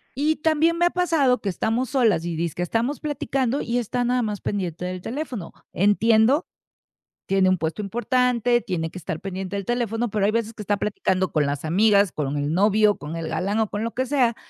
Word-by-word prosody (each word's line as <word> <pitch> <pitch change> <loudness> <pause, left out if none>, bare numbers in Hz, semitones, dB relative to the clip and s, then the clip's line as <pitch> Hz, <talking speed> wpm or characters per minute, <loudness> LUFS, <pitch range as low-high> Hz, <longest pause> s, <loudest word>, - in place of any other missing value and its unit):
Y 305 +3 +1
también 320 +2 +2
me 345 - +3
ha - - +4
pasado 325 -9 +2
que - - -5
estamos 225 +6 -1
solas 225 -11 +2
y 170 -1 -3
dizque 170 +1 -3
estamos 230 - -1
platicando 275 -3 -1
y 235 +1 -1
está 245 +1 -1
nada 250 +1 +1
más 210 -3 -3
pendiente 180 -5 -3
del 180 0 -4
teléfono. 245 - -5 0.2
Entiendo, 220 - +3 0.8
tiene 190 -1 +3
un 185 0 +2
puesto 165 +5 -3
importante, 240 +2 +1
tiene 165 -7 -3
que - - -8
estar 160 -2 -5
pendiente 195 0 -5
del 200 - -3
teléfono, 240 -1 -1
pero 210 -1 -1
hay 205 - +3
veces 225 0 -2
que 210 - -7
está 205 +1 0
platicando 190 -2 -1
con 150 -2 +2
las 145 +1 -3
amigas, 200 +3 +3
con 145 -1 -2
el 145 +1 -1
novio, 210 +2 +4
con 150 +3 -7
el 165 -1 -4
galán 195 +6 -1
o 220 -1 +1
con 205 +2 -4
lo 230 - -2
que 260 +1 -1
sea 245 -5 +2
215 Hz, 205 wpm, -23 LUFS, 185-245 Hz, 0.8 s, ha